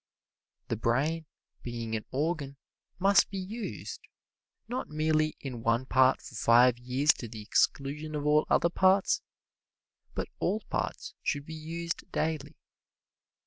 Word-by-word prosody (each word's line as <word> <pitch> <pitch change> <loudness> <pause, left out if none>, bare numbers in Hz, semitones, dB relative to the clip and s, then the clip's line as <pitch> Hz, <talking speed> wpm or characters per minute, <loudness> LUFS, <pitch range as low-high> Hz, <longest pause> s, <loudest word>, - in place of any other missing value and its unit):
The - - +1
brain, 145 +8 0 0.3
being 115 -2 -4
an 110 - -4
organ, 145 -1 -2 0.4
must 195 +2 +4
be 195 - -5
used, 210 +5 -5 0.7
not 245 +3 -3
merely 155 0 +1
in 125 -4 -6
one 115 +2 +1
part 130 0 +4
for - - -10
five 120 +1 +5
years 130 +4 +3
to 120 - -5
the 110 -1 -8
exclusion 150 +7 0
of 145 -1 -3
all 150 +1 +4
other 170 - +3
parts, 190 +2 +3 0.9
but - - -2
all 215 - 0
parts - - -3
should 145 -1 -1
be 160 - -8
used 165 +2 -5
daily. 155 -2 -2
150 Hz, 135 wpm, -30 LUFS, 125-165 Hz, 0.9 s, five